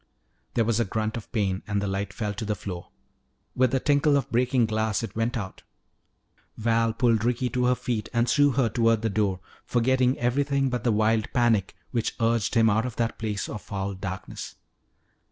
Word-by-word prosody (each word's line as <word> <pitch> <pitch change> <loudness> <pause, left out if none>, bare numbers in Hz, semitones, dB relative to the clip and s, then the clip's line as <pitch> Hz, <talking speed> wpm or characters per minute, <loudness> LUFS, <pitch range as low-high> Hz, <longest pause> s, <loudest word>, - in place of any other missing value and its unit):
There 115 - +3
was 115 0 +1
a 115 - +2
grunt 110 +2 -2
of 115 - -7
pain 100 -4 0
and 100 -2 0
the 100 - -2
light 100 0 -2
fell 105 0 -3
to 105 - -5
the 105 0 -1
floor. 90 -2 -7 0.7
With 130 0 +3
the 130 +2 +1
tinkle 145 +1 +3
of 135 -4 -3
breaking 125 0 +2
glass 110 0 -1
it 115 - -6
went 115 +2 0
out. 95 -4 -6 1.0
Val 115 0 +2
pulled 115 -2 +2
Ricky 125 +1 0
to 125 -1 0
her 125 0 +3
feet 120 -3 -3
and 120 0 +1
threw 145 +1 +4
her 130 -1 +2
toward 115 0 +2
the 110 - 0
door, 100 -3 0 0.2
forgetting 125 +1 +2
everything 135 +2 +1
but 125 - -2
the 120 - +2
wild 110 +1 +1
panic 115 -6 +2 0.2
which 115 -3 -1
urged 115 -1 +1
him 115 -1 +5
out 110 +3 +2
of 120 - -7
that 115 -1 -2
place 105 -2 -2
of 105 - -6
foul 100 -1 -4
darkness. 95 0 -6
115 Hz, 195 wpm, -26 LUFS, 105-125 Hz, 1.0 s, him